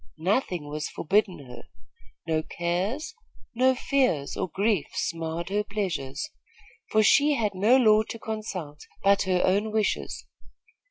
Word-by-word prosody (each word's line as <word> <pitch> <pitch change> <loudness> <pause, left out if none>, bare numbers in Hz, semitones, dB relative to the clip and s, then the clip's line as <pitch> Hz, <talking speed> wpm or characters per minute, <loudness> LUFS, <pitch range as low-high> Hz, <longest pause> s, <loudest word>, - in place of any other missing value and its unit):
Nothing 180 - -1
was 150 +1 -4
forbidden 185 -4 0
her. 125 -1 -11 0.6
No 160 -1 0
cares, 180 - -2 0.4
no 260 +2 +3
fears, 250 - 0
or - - -2
griefs 200 -3 -1
marred 165 +1 -4
her 205 +2 0
pleasures; 185 - -3 0.6
for 215 0 +3
she 295 +6 +5
had 215 -5 0
no 210 +7 +4
law 215 -4 +5
to - - -5
consult 200 -10 -6 0.2
but 200 0 +4
her 180 -1 +2
own 205 +3 +1
wishes. 215 -1 -1
200 Hz, 130 wpm, -26 LUFS, 165-220 Hz, 0.6 s, she